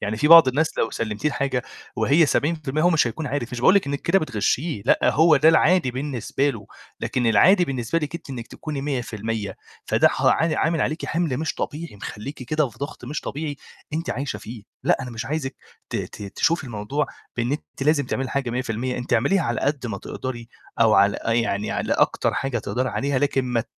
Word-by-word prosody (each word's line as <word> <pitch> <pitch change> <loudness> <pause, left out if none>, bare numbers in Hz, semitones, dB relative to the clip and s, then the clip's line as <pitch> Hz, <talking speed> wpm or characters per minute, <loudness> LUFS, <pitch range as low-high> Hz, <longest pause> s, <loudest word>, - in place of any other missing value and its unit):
يعني 105 +1 -2
في 150 +7 +1
بعض 165 -4 +10
الناس 155 +5 0
لو 115 - +1
سلّمتيه 110 +5 -2
الحاجة 135 -3 -1 0.3
وهي 155 +3 +4
70% 155 -1 0
هو 175 - +5
مش 160 -7 +3
هيكون 145 +7 -4
عارف، 130 -3 -3
مش 120 - -4
باقُول 185 - +6
لِك 200 - +3
إنِك 140 0 -2
كده 190 +3 +3
بتغشّيه، 130 - -1
لأ - - +5
هو 160 0 +5
ده 150 +3 +5
العادي 160 -2 +4
بالنسبة 135 +1 -1
له، 110 -6 -9 0.3
لكن 125 -2 -1
العادي 180 - +5
بالنسبة 130 0 -1
لِك 150 -1 -5
أنتِ 170 -4 -7
إنِك 120 -3 -6
تكوني 150 -3 -6
100% 115 -6 -3 0.3
فده - - +4
ه - - +1
ع 160 -1 +1
عامِل 165 +1 +1
عليكِ 155 +2 -1
حِمل 165 -5 -1
مش 155 0 -2
طبيعي 155 -6 -5
مخلّيكِ 130 +7 -7
كده 150 +2 0
في 115 - -19
ضغط 140 -2 -6
مش 145 +5 -4
طبيعي 145 0 -4 0.4
أنتِ 165 +2 -2
عايشة 140 +3 -3
فيه، 115 -1 -9 0.2
لأ - - +4
أنا 125 - -6
مش 115 -1 -5
عايزِك 145 -2 -3 0.3
ت - - -2
ت - - -6
تشوفي 165 -2 +1
الموضوع 120 +5 -2 0.3
بإن 120 +2 0
أنتِ 145 -2 -6
لازم 145 -1 +2
تعملي 130 - -2
الحاجة 130 -1 -2
100% 125 +1 -2
أنتِ 125 - -5
اعمليها 140 +11 +3
على 120 -6 -1
قد 140 -2 -1
ما 105 -4 -4
تقدري، 120 0 -6 0.3
أو 110 -2 +5
على 100 +1 +4
آآ 115 - +1
يعني 115 -3 0
على - - -1
أكتر - - +1
حاجة 135 -3 -1
تقدري 125 +5 -2
عليها، 140 0 -1
لكن 135 -2 +1
ما 120 -2 -1
135 Hz, 205 wpm, -23 LUFS, 120-155 Hz, 0.4 s, بعض